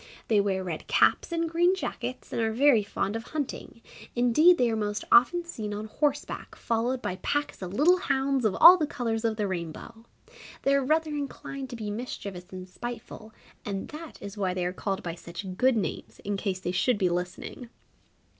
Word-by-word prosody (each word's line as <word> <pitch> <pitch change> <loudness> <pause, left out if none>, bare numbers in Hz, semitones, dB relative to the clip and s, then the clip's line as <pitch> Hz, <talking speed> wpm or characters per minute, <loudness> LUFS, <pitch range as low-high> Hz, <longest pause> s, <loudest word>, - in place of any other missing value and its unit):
They 210 -3 +5
wear 190 -2 -1
red 170 -4 -5
caps - - +3
and 335 0 0
green 345 +3 +3
jackets 255 -8 -5
and - - 0
are 225 0 +1
very 260 -1 +5
fond 200 0 -2
of 225 - -2
hunting 280 -5 -5 0.3
indeed 275 +9 +5
they 245 -5 +2
are - - 0
most 210 -1 -2
often 345 +9 +6
seen 215 -10 -5
on 210 +1 -5
horseback 290 +5 -2
followed 240 +3 -1
by 185 - -2
packs 290 +4 -2
of 180 -1 -5
little 345 - +5
hounds 275 -5 0
of 215 -4 +2
all 365 +2 +10
the 310 -4 0
colours 230 -5 -2
of 225 -1 0
the 210 -2 0
rainbow. 185 +5 -6 0.6
They 275 - +3
are 275 -1 +3
rather 310 +3 +1
inclined 275 -2 -5
to 245 - -6
be 215 -3 -4
mischievous 200 -5 -6
and 185 -1 -8
spiteful, 225 +2 -8 0.3
and 195 -2 -4
that 310 +1 -9
is 200 +1 -7
why 185 -2 0
they 180 -1 -1
are 180 - -2
called 195 +1 -3
by 170 - -3
such 170 +3 -8
good 255 +4 +3
names, 205 - -4
in 205 0 -2
case 195 -2 -2
they 180 -1 -3
should 210 +6 +2
be 190 -3 +2
listening! 180 +7 -4
230 Hz, 195 wpm, -28 LUFS, 195-275 Hz, 0.6 s, all